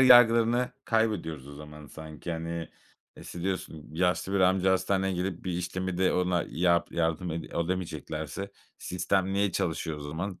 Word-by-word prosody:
yargılarını 120 -1 +7
kaybediyoruz 95 - 0
o - - -9
zaman 75 0 -10
sanki, 80 +2 -7
hani. 85 0 -4 0.5
İşte, 85 - -8
diyorsun: 90 -5 -3
"Yaşlı 90 +3 +1
bir 100 - +2
amca 95 +1 +4
hastaneye 95 +1 +1
gelip 90 0 -3
bir 90 - -1
işlemi 90 +1 -2
de 95 - +3
ona 90 -1 +1
yap 85 0 +2
yardım 85 +1 0
ede 80 +1 -3
edemeyeceklerse 85 +1 -3 0.3
sistem 95 +1 0
niye 100 -1 +2
çalışıyor 80 -2 -1
o - - -9
zaman?" 85 +5 -4
90 Hz, 150 wpm, -29 LUFS, 80-95 Hz, 0.5 s, yargılarını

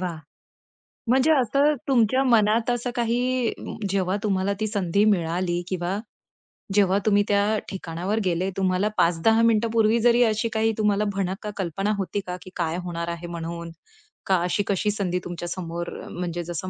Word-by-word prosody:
वाह! 180 -3 -3 0.9
म्हणजे 265 +5 +4
असं 275 +5 +3
तुमच्या 260 0 +3
मनात 225 -1 +3
असं 245 0 -1
काही 245 +1 +1 0.4
जेव्हा 190 0 0
तुम्हाला 200 -1 +1
ती 215 - 0
संधी 200 -1 +1
मिळाली 175 -2 +1
किंवा 185 +1 -2 0.8
जेव्हा 195 -2 +4
तुम्ही 205 -1 +4
त्या 205 +1 +2
ठिकाणावर 185 +2 -3
गेले 180 +1 0
तुम्हाला 190 +1 +1
5-10 175 +7 +3
मिनिटांपूर्वी 225 0 +3
जरी 240 +1 +4
अशी 220 0 +1
काही 220 0 +2
तुम्हाला 210 -1 +2
भणक 190 -1 -2
का 210 - -3
कल्पना 195 +3 -1
होती 195 0 -2
का 180 0 -4
की - - -11
काय 170 -1 -1
होणार 170 -1 -4
आहे 170 0 -5
म्हणून? 170 0 -6 0.5
का 190 -1 +3
अशी 180 +3 0
कशी 200 +2 +1
संधी 185 -3 -1
तुमच्या 175 0 -5
समोर 170 -1 -4 0.2
म्हणजे 175 -1 -4
जसं 175 +2 -5
195 Hz, 155 wpm, -24 LUFS, 175-220 Hz, 0.9 s, म्हणजे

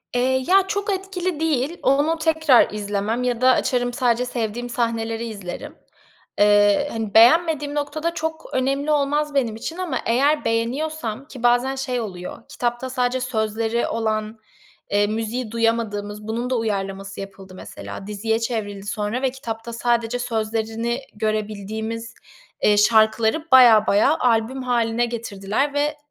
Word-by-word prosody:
Eee, 260 +1 +1
ya, 390 +1 +5
çok 405 +1 -1
etkili 370 -3 -3
değil, 315 0 0
onu 290 +4 +2
tekrar 320 -5 +4
izlemem 210 +3 -2
ya 245 -1 -1
da 255 0 +6
açarım 245 -1 0
sadece 245 -2 +1
sevdiğim 240 0 -3
sahneleri 230 -1 -2
izlerim. 200 -6 -7 0.6
Eee, 205 +5 +4
hani, 220 -3 -4
beğenmediğim 295 +4 +5
noktada 300 +3 -2
çok 320 -1 -5
önemli 275 +3 0
olmaz 295 0 +1
benim 245 -6 0
için 320 +9 -6
ama 350 -8 -2
eğer 280 +6 +2
beğeniyorsam 240 +2 -2
ki 255 -5 -11
bazen 245 +2 +3
şey 260 -2 -2
oluyor 185 -1 -7
kitapta 240 +1 -2
sadece 250 0 0
sözleri 225 -1 -1
olan, 220 -1 -2 0.5
eee, 205 0 +3
müziği 225 +2 -3
duyamadığımız, 215 -2 -1
bunun 235 +3 -2
da 255 - +1
uyarlaması 195 -3 -3
yapıldı 195 -1 -10
mesela, 195 +1 -9
diziye 220 +2 -1
çevrildi 210 -4 -4
sonra 210 +3 -2
ve 265 - +2
kitapta 235 -3 -6
sadece 235 0 0
sözlerini 225 +1 -2
görebildiğimiz, 215 +1 -3 0.5
eee, 210 0 +4
şarkıları 220 +7 +3
bayağı 235 -5 +7
bayağı 245 +10 +3
albüm 240 +2 +1
hâline 240 -1 +1
getirdiler 230 +3 -2
ve 295 +1 0
235 Hz, 135 wpm, -22 LUFS, 220-270 Hz, 0.6 s, bayağı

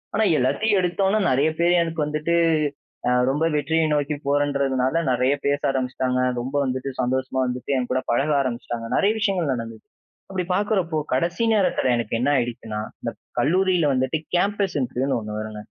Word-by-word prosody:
ஆனா, 220 0 +3
எல்லாத்தையும் 205 - +2
எடுத்தோன்னா, 190 +4 +1
நிறைய 140 +4 +3
பேரு 175 +1 +4
எனக்கு 165 -1 -5
வந்துட்டு 155 +3 -1 0.7
அ, - - +3 0.2
ரொம்ப 145 +4 0
வெற்றிய 160 +2 +1
நோக்கி 145 0 0
போறன்றதுனால 140 0 +1
நிறைய 125 +2 +2
பேச 145 0 +2
ஆரம்பிச்சுட்டாங்க. 130 -1 -1 0.2
ரொம்ப 130 +4 -5
வந்துட்டு 130 +1 -2
சந்தோஷமா 130 +1 -1
வந்துட்டு 125 +2 -4
என்கூட 125 +1 -1
பழக 140 +6 +1
ஆரம்பிச்சுட்டாங்க. 120 -2 -4
நிறைய 200 +2 +3
விஷயங்கள் 185 -8 0
நடந்தது. 115 -2 -6 0.5
அப்பிடி 185 -2 -2
பார்க்கிறப்போ, 190 -6 0 0.2
கடைசி 170 - 0
நேரத்தில 185 -10 +2
எனக்கு 115 -2 -3
என்ன 130 +4 +1
ஆயிடுச்சுன்னா, 115 -3 -3 0.2
இந்த - - -3 0.3
கல்லூரில 180 -1 +2
வந்துட்டு 130 +4 0 0.2
கேம்பஸ் 200 -2 +1
இன்டர்வியூன்னு 130 +1 -1
ஒண்ணு 105 0 -5
வருங்க. 110 0 -6
140 Hz, 150 wpm, -23 LUFS, 125-170 Hz, 0.7 s, பேரு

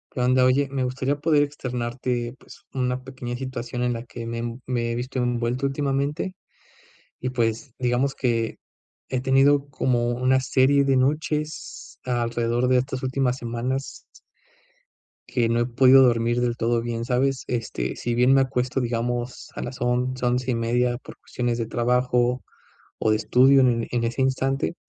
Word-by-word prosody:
Anda, 125 0 +3
oye, 135 +2 +3
me 135 -1 -2
gustaría 130 +2 -1
poder 150 0 +2
externarte, 125 -3 -3
pues, - - -16
una 125 -1 -1
pequeña 130 -2 -6
situación 125 -2 -5
en 125 0 +1
la 115 - -5
que 120 -1 -8
me 115 0 -4
env 120 +1 -4
me 120 -2 -1
he - - -2
visto 130 +2 -3
envuelto 120 +1 -1
últimamente, 140 +5 -1 0.9
y 130 - -2
pues, 120 +1 -1
digamos 125 +2 +1
que 115 -3 -1 0.5
he 130 - 0
tenido 140 +2 +3
como 120 -3 0
una 130 +2 +2
serie 135 +2 +3
de 135 -1 +2
noches 150 +3 -2
alrededor 120 0 0
de 130 0 +4
estas 130 +1 -3
últimas 130 -1 0
semanas 125 +2 -4 1.2
que 120 -2 +1
no 115 0 +2
he - - +2
podido 130 +2 +6
dormir 120 -1 +2
del 120 -1 0
todo 115 0 +1
bien, 115 0 -3
¿sabes? 130 +2 0
Este, 115 -3 -3
si 120 0 -2
bien 125 +2 +4
me 135 - +5
acuesto, 130 0 -1
digamos, 120 +1 -3
a - - -4
las 125 +1 -6
11:00, 125 +1 0
11:30, 120 0 +1
por - - -13
cuestiones 120 -1 -3
de 115 -2 -2
trabajo, 125 +1 +1 0.6
o - - +1
de 110 - +3
estudio, 130 +5 +5
en 120 -3 +2
en 120 -1 0
ese 115 +3 -1
instante, 135 +3 0
125 Hz, 160 wpm, -24 LUFS, 120-130 Hz, 1.2 s, podido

